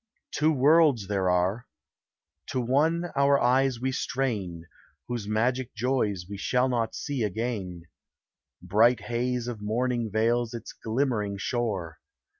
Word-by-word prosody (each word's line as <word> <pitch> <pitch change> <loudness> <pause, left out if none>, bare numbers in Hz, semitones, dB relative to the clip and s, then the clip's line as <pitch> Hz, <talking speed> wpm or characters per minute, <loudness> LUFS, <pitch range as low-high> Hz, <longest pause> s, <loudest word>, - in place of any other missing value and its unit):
Two 155 +1 +2
worlds 145 -4 +4
there 95 -2 0
are. 90 +7 0 0.8
To 130 - -2
one 160 +8 +1
our 140 0 +4
eyes 130 0 +2
we 130 +2 -1
strain, 110 -12 -2 0.4
Whose 120 -4 -4
magic 120 +4 0
joys 110 -6 0
we 100 0 -7
shall 125 +5 +1
not 120 -3 -1
see 140 -4 -3
again; 105 -5 -3 0.8
Bright 110 +7 +3
haze 120 0 -2
of 115 -4 -5
morning 120 +2 -1
veils 115 +2 +1
its 115 - -8
glimmering 110 -4 -1
shore. 100 -8 -3
120 Hz, 125 wpm, -27 LUFS, 105-130 Hz, 0.8 s, worlds